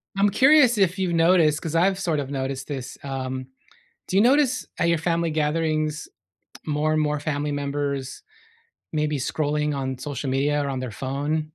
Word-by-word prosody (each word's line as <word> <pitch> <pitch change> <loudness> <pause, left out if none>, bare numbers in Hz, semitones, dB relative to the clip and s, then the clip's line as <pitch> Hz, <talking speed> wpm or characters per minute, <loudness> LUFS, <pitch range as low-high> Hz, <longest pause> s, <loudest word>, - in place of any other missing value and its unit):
I'm 200 +1 +3
curious 260 +2 +5
if 190 -2 +2
you've 185 -3 -1
noticed- 165 -2 +4
'cause 160 0 -4
I've 190 +3 +3
sort 165 -5 0
of 140 -1 -4
noticed 135 -1 -4
this- 135 -4 -6
um, 130 -1 -4 0.6
do 185 - -1
you 200 - +6
notice 265 +2 +3
at 170 - +2
your 170 -1 +2
family 170 0 0
gatherings, 155 0 -1 0.6
more 150 0 0
and 155 - +2
more 150 0 0
family 145 0 -2
members, 140 -1 -3 0.7
maybe 150 -1 0
scrolling 150 +2 -1
on 130 -1 -3
social 135 0 -4
media 145 +2 +1
or 140 - -3
on 130 -1 -3
their 130 -2 -5
phone? 145 +4 -1
150 Hz, 170 wpm, -24 LUFS, 140-170 Hz, 0.7 s, you